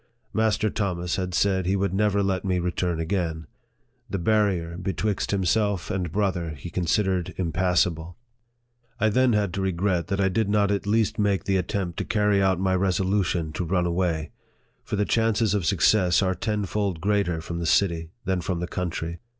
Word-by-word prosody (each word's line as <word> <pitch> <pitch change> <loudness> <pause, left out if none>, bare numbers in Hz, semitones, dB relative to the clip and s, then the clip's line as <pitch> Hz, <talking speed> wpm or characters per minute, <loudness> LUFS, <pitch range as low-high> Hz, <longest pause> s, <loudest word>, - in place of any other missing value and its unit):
Master 110 -1 +1
Thomas 90 -4 -2
had 90 -1 -2
said 95 -2 +1
he 95 - +2
would 100 -1 0
never 100 0 +2
let 95 -1 0
me 95 -2 0
return 90 -1 -1
again. 80 -2 -2 0.6
The - - -2
barrier 95 -3 +1
betwixt 95 +2 -2
himself 100 -1 0
and 90 -5 -2
brother 90 -5 -1
he 85 +5 -8
considered 90 +1 0
impassable. 90 -1 0 0.8
I 110 - +3
then 125 +2 +3
had 100 -4 +1
to 95 - -2
regret 90 -2 0
that 100 +1 -2
I 95 - +3
did 100 +2 0
not 100 -1 +2
at 100 0 -1
least 110 +1 +1
make 100 -2 +1
the 95 -1 +1
attempt 90 -1 -2
to - - -1
carry 105 -2 +2
out 95 -2 +2
my 95 0 +1
resolution 95 -3 0
to 85 - -2
run 90 +1 0
away; 85 -3 -1 0.5
for 110 - -3
the 105 0 +1
chances 115 -2 +1
of 100 -6 0
success 90 +1 +3
are 95 -1 +1
tenfold 100 -1 -2
greater 100 -3 0
from 85 +1 -5
the 85 - -2
city 85 -3 +2 0.2
than 95 -2 0
from 90 0 -2
the 90 - -2
country. 85 -2 -4
95 Hz, 175 wpm, -25 LUFS, 85-100 Hz, 0.8 s, I